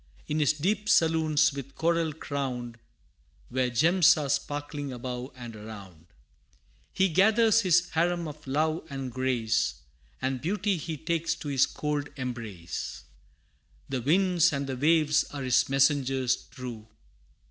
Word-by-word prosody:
In 150 Hz, +1 st, -1 dB
his 150 Hz, 0 st, +3 dB
deep 200 Hz, +7 st, -1 dB
saloons 160 Hz, -2 st, +3 dB
with 140 Hz, -1 st, -8 dB
coral 165 Hz, -1 st, +1 dB
crowned, 130 Hz, -6 st, -4 dB, 0.7 s
Where 125 Hz, 0 st, 0 dB
gems 165 Hz, +9 st, +5 dB
are 145 Hz, -3 st, -2 dB
sparkling 145 Hz, 0 st, -3 dB
above 125 Hz, +1 st, -5 dB
and 120 Hz, -3 st, -9 dB
around, 100 Hz, -6 st, -11 dB, 0.8 s
He 190 Hz, -, +2 dB
gathers 220 Hz, +5 st, +4 dB
his 180 Hz, -2 st, +3 dB
harem 170 Hz, +1 st, 0 dB
of 150 Hz, 0 st, -10 dB
love 155 Hz, +4 st, 0 dB
and 135 Hz, -2 st, -5 dB
grace, 115 Hz, -, 0 dB, 0.4 s
And 130 Hz, -1 st, -2 dB
beauty 200 Hz, +3 st, 0 dB
he 160 Hz, 0 st, -5 dB
takes 165 Hz, +2 st, -1 dB
to 150 Hz, -, -7 dB
his 135 Hz, -1 st, +3 dB
cold 150 Hz, -1 st, -3 dB
embrace. 115 Hz, -9 st, -5 dB, 0.9 s
The 130 Hz, -2 st, -2 dB
winds 175 Hz, +4 st, +3 dB
and 140 Hz, -2 st, -2 dB
the 135 Hz, -1 st, -4 dB
waves 150 Hz, +1 st, +3 dB
are 140 Hz, -2 st, -7 dB
his 130 Hz, 0 st, +2 dB
messengers 135 Hz, -2 st, +2 dB
true. 125 Hz, -4 st, -9 dB
145 Hz, 135 wpm, -28 LUFS, 125-165 Hz, 0.9 s, gems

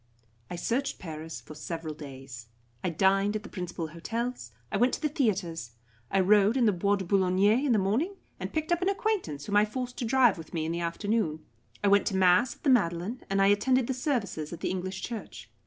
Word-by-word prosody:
I -, -, -4 dB
searched 250 Hz, +10 st, -1 dB
Paris 160 Hz, -2 st, -7 dB
for -, -, -11 dB
several 160 Hz, +1 st, -5 dB
days. 135 Hz, -5 st, -10 dB, 0.4 s
I -, -, +1 dB
dined 195 Hz, +4 st, +2 dB
at 215 Hz, -, -3 dB
the -, -, -9 dB
principal 175 Hz, -3 st, -5 dB
hotels; 225 Hz, -, -4 dB, 0.2 s
I -, -, 0 dB
went 245 Hz, +4 st, +3 dB
to -, -, -9 dB
the 305 Hz, -, +2 dB
theatres; 180 Hz, -, -1 dB, 0.4 s
I 195 Hz, -, +3 dB
rode 205 Hz, +4 st, +4 dB
in 245 Hz, -, +3 dB
the 215 Hz, -, +5 dB
Bois 200 Hz, +2 st, +1 dB
de 195 Hz, -2 st, -4 dB
Boulogne 185 Hz, 0 st, +2 dB, 0.3 s
in 285 Hz, -, +2 dB
the 225 Hz, -, +4 dB
morning, 230 Hz, -, 0 dB, 0.2 s
and -, -, -4 dB
picked 315 Hz, +1 st, -2 dB
up 345 Hz, 0 st, +2 dB
an 370 Hz, -, +2 dB
acquaintance, 395 Hz, -, -1 dB
whom 205 Hz, -, +1 dB
I 210 Hz, -, +6 dB
forced 250 Hz, +3 st, -5 dB
to 240 Hz, -, -1 dB
drive 240 Hz, -5 st, +4 dB
with 165 Hz, -, -9 dB
me 160 Hz, -1 st, -1 dB
in 160 Hz, -, -2 dB
the 170 Hz, +1 st, -2 dB
afternoon. 170 Hz, -2 st, -1 dB, 0.4 s
I -, -, +3 dB
went 200 Hz, 0 st, +4 dB
to 195 Hz, -, 0 dB
mass 185 Hz, +6 st, +4 dB
at -, -, -29 dB
the 285 Hz, -, +2 dB
Madeleine, 195 Hz, 0 st, +1 dB
and 195 Hz, 0 st, +1 dB
I 195 Hz, -, +5 dB
attended 250 Hz, +5 st, +3 dB
the 265 Hz, -, -1 dB
services 230 Hz, -, -2 dB
at 170 Hz, 0 st, -7 dB
the -, -, -1 dB
English 185 Hz, +1 st, -4 dB
Church. 230 Hz, -3 st, -7 dB
195 Hz, 220 wpm, -28 LUFS, 170-240 Hz, 0.4 s, I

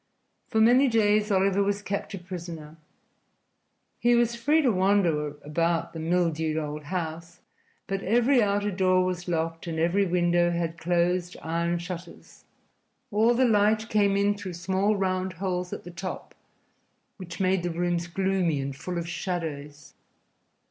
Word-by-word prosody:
For 220 Hz, -, 0 dB
many 245 Hz, +5 st, +5 dB
days 210 Hz, -2 st, +2 dB
Oliver 195 Hz, 0 st, +2 dB
was 200 Hz, 0 st, -1 dB
kept 200 Hz, 0 st, -4 dB
a -, -, -6 dB
prisoner. 170 Hz, -4 st, -8 dB, 1.2 s
He 240 Hz, 0 st, +4 dB
was 235 Hz, 0 st, +2 dB
free 295 Hz, +7 st, +2 dB
to 255 Hz, -, +4 dB
wander 180 Hz, -7 st, +1 dB
about 165 Hz, +2 st, -1 dB
the 165 Hz, -, -6 dB
mildewed 160 Hz, -2 st, 0 dB
old 150 Hz, -1 st, -4 dB
house, 170 Hz, 0 st, -5 dB, 0.5 s
but 195 Hz, 0 st, -3 dB
every 240 Hz, +6 st, +3 dB
outer 205 Hz, 0 st, +1 dB
door 185 Hz, -1 st, +2 dB
was 180 Hz, -1 st, -3 dB
locked 165 Hz, -1 st, -2 dB
and 165 Hz, -1 st, -3 dB
every 175 Hz, +5 st, +2 dB
window 175 Hz, 0 st, +2 dB
had 170 Hz, -1 st, -2 dB
closed 175 Hz, +1 st, 0 dB
iron 170 Hz, +1 st, -1 dB
shutters. 175 Hz, 0 st, -9 dB, 0.7 s
All 225 Hz, +3 st, +3 dB
the 255 Hz, +2 st, +3 dB
light 215 Hz, 0 st, +2 dB
came 200 Hz, -2 st, +2 dB
in 200 Hz, +1 st, +3 dB
through 195 Hz, -3 st, -7 dB
small 190 Hz, +4 st, 0 dB
round 185 Hz, -1 st, -1 dB
holes 180 Hz, 0 st, -3 dB
at -, -, -6 dB
the 175 Hz, -, -9 dB
top, 185 Hz, +2 st, -7 dB, 0.8 s
which 175 Hz, -4 st, -9 dB
made 190 Hz, -1 st, +2 dB
the 175 Hz, -, -2 dB
rooms 175 Hz, 0 st, -1 dB
gloomy 185 Hz, -4 st, 0 dB
and 135 Hz, 0 st, -4 dB
full 175 Hz, +5 st, -5 dB
of 170 Hz, 0 st, -3 dB
shadows. 155 Hz, -5 st, -5 dB
180 Hz, 150 wpm, -26 LUFS, 170-200 Hz, 1.2 s, many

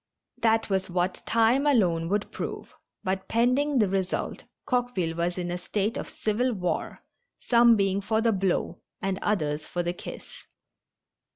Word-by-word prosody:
That 225 Hz, -1 st, +3 dB
was 190 Hz, -1 st, -1 dB
what 180 Hz, +1 st, -1 dB
time 230 Hz, +5 st, +3 dB
alone 175 Hz, -, +2 dB
would 205 Hz, +1 st, -1 dB
prove, -, -, -6 dB, 0.3 s
but 190 Hz, 0 st, -2 dB
pending 255 Hz, +5 st, +2 dB
the 215 Hz, -4 st, +4 dB
result 190 Hz, -1 st, -2 dB, 0.2 s
Coqueville 245 Hz, -11 st, 0 dB
was 175 Hz, +2 st, -1 dB
in 175 Hz, -1 st, -3 dB
a 175 Hz, -, -3 dB
state 205 Hz, +4 st, -1 dB
of -, -, -5 dB
civil 240 Hz, +4 st, 0 dB
war, 180 Hz, -4 st, -2 dB, 0.4 s
some 235 Hz, -1 st, +5 dB
being 195 Hz, -1 st, +1 dB
for 220 Hz, +2 st, 0 dB
the 230 Hz, 0 st, +3 dB
blow 190 Hz, -3 st, -1 dB, 0.2 s
and 195 Hz, 0 st, -2 dB
others 155 Hz, -7 st, 0 dB
for 175 Hz, -, -2 dB
the 175 Hz, 0 st, -1 dB
kiss. -, -, -8 dB
195 Hz, 155 wpm, -27 LUFS, 180-230 Hz, 0.4 s, some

